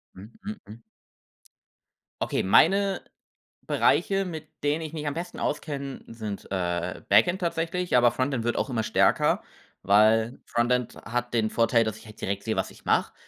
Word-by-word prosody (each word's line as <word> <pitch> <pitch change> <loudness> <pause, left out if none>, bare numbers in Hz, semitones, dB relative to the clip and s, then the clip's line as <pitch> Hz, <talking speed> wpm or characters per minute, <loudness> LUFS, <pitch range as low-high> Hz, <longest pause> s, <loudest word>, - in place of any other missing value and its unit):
Hm. 100 +5 -12
Hm. 210 +1 -6
Hm. 110 +3 -12 1.4
Okay, - - -1
meine 195 - +4 0.7
Bereiche, 195 0 +2
mit 160 -3 -6 0.2
denen 150 +2 +1
ich 155 - -5
mich 155 -2 -5
am 145 - -1
besten 175 +3 -6
auskenne, 140 -2 -4
sind, 110 -3 -6
äh, 90 -2 -2
Backend 180 +1 +4
tatsächlich, 175 0 -1
aber 120 -1 +6
Frontend 130 -2 -1
wird 120 0 0
auch 135 - -1
immer 115 -3 0
stärker, 110 0 +2 0.4
weil 110 +4 +4
Frontend 125 +1 0
hat 120 +1 -2
den 110 -2 +1
Vorteil, 115 0 +3
dass 110 -1 -4
ich - - -15
halt 110 0 -13
direkt 100 +1 -3
sehe, 110 - -1
was - - -2
ich - - -18
mache. - - +1
120 Hz, 165 wpm, -26 LUFS, 110-160 Hz, 1.4 s, aber